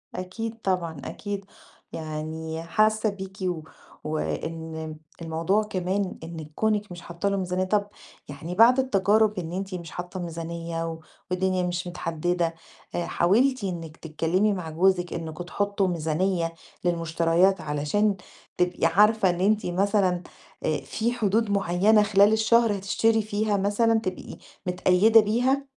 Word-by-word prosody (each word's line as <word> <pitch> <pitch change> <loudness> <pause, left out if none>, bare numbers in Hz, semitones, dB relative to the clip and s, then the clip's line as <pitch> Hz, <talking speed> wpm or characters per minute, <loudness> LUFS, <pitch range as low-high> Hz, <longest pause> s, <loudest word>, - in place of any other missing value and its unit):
أكيد 220 +5 -5
طبعًا، 170 -6 -1
أكيد. 200 -1 -5 0.5
يعني 160 +1 -5
حاسّة 215 +5 +2
بيكِ 190 -1 -8
و 175 -3 -1 0.4
وإن 160 0 -4 0.3
الموضوع 165 +6 +1
كمان 190 -1 -2
إنِّك 160 -2 -8
كُونِك 210 -2 0
مش 175 0 -8
حاطّة 175 +3 -3
له 200 - 0
ميزانية، 185 0 -1
طَب 205 +1 +1 0.4
يعني 160 +5 -6
بعد 240 +5 +6
التجارب 210 -3 +3
إن 170 -1 -5
أنتِ 190 +1 -4
مش 170 -3 -7
حاطّة 180 +1 -6
ميزانية 165 -1 -4
و 165 - -8 0.3
والدنيا 185 0 +1
مش 175 0 -2
متحدِّدة، 170 0 -1 0.4
آآ 175 - -1
حاولتِ 240 +7 +2
إنِّك 165 -4 -5
تتكلِّمي 165 +6 0
مع 180 -4 -5
جوزِك 175 +2 +2
إنّكم 165 +1 -5
تحُطّوا 200 +1 -1
ميزانية 165 +1 0 0.3
للمُشتريات 170 +2 +2
علشان 155 +8 0 0.4
تبقي 180 -1 +1
عارفة 210 +3 +4
إن 175 0 -1
أنتِ 210 +2 +2
مثلًا 185 -1 +1 0.4
آآ - - +1
في 230 +2 -2
حدود 220 -2 +1
معيّنة 200 +2 +4
خلال 205 +1 +5
الشهر 220 -1 +3
هتشتري 220 +3 +2
فيها 210 0 0
مثلًا 220 +3 +2
تبقي 185 -4 -6 0.3
متقيّدة 185 +5 +5
بيها؟ 250 +6 +1
185 Hz, 135 wpm, -26 LUFS, 165-210 Hz, 0.5 s, بعد